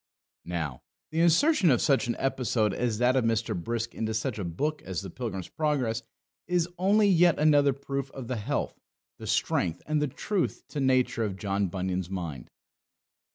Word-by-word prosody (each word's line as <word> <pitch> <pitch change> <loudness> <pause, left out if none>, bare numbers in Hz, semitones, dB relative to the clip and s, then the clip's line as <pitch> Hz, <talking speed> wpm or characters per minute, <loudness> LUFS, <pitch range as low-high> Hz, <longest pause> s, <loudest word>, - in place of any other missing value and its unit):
Now, 80 -7 -3 0.3
the 160 - -1
insertion 175 - +4
of 125 - +4
such 135 -5 +2
an 120 - 0
episode 120 -6 0
as 120 -1 -1
that 125 +2 +3
of 130 - +3
Mr. 115 0 0
Brisk 115 +6 -3
into 110 0 -2
such 110 0 -2
a - - -2
book 145 - -2
as 95 0 -4
the 95 - -7
Pilgrim's 95 -7 -5
Progress 130 -7 0 0.5
is 175 -2 +1
only 205 +3 +4
yet 175 -3 +5
another 145 -2 +5
proof 140 0 -4
of 130 -3 -8
the 125 -1 -2
health, 130 +8 -2 0.4
the - - -7
strength, 85 -1 0
and 155 -1 0
the 150 - +1
truth 195 +8 -2
to 150 - -4
nature 130 -3 +2
of 100 -3 -3
John 100 0 0
Bunyan's 90 0 -3
mind. 85 -9 -5
125 Hz, 175 wpm, -28 LUFS, 100-150 Hz, 0.5 s, yet